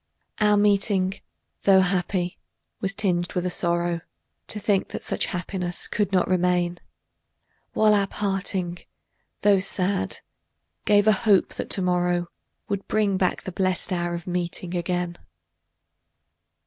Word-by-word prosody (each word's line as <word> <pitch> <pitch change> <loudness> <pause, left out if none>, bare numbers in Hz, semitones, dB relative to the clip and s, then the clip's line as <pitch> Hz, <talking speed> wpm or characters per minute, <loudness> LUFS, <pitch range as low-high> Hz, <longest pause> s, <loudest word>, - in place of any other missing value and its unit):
Our 210 -1 +4
meeting, 200 -2 +2 0.4
tho' 190 -1 +6
happy, 180 -1 0 0.4
was 195 0 -1
tinged 180 -4 0
by 180 - +1
a 180 0 -2
sorrow 170 -1 0 0.5
To 215 - -3
think 200 -1 +1
that - - -6
such - - 0
happiness 180 -1 -1
could 205 -1 -1
not 185 -2 +2
remain; 180 -1 +1 0.9
While 215 -1 +4
our 200 -1 +2
parting, 195 -3 -2 0.6
tho' 205 -2 +5
sad, 185 - 0 0.6
gave 205 -1 +4
a 215 - +6
hope 205 -2 +3
that - - -5
to 190 - +2
morrow 175 -1 +1 0.4
Would 200 -1 -3
bring 205 -3 +1
back 185 -1 0
the 185 - -5
blest 185 +1 -1
hour 175 -1 -1
of 170 - -7
meeting 180 0 -3
again. 175 0 -2
185 Hz, 135 wpm, -24 LUFS, 175-200 Hz, 0.9 s, tho